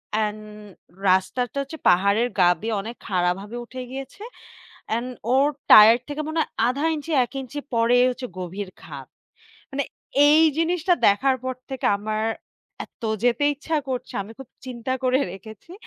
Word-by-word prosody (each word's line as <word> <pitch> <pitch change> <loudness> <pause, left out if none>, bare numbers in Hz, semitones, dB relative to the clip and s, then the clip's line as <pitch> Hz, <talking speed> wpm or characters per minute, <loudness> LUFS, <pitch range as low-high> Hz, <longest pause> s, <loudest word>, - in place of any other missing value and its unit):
And 215 -1 -1 0.7
রাস্তাটা 215 +8 +1
হচ্ছে 275 +4 -7
পাহাড়ের 200 +6 +3
গা 175 - +6
দিয়ে 225 +1 -2
অনেক 230 +3 -7
খাড়াভাবে 190 +3 -1
উঠে 255 +1 -8
গিয়েছে। 270 +10 -8 0.7
অ্যান্ড 235 +3 -1 0.3
ওর 270 +2 +4 0.2
টায়ার 220 +2 +10
থেকে 295 +1 -3
মনে 315 +1 -2
হয় - - -4 0.2
১,৫ 280 +6 0
ইঞ্চি 305 +2 -6
১ - - -22
ইঞ্চি 265 +3 -7
পরে 230 +1 +3
হচ্ছে 250 0 -5
গভীর 185 +2 -5
খাদ। - - -10 0.6
মানে 275 +1 -2 0.4
এই 305 +2 +6 0.2
জিনিসটা 345 +1 +2
দেখার 260 +7 +3
পর 260 0 -2 0.2
থেকে 265 - -2
আমার 215 +1 -3 0.6
এত - - -35 0.2
যেতে 245 +3 +2
ইচ্ছা 315 +3 -3
করছে। 255 -1 -4
আমি 210 +3 -11
খুব 270 -3 -11 0.2
চিন্তা 250 0 -4
করে 255 +1 +3
রেখেছি 215 - -12
245 Hz, 150 wpm, -23 LUFS, 215-275 Hz, 0.7 s, টায়ার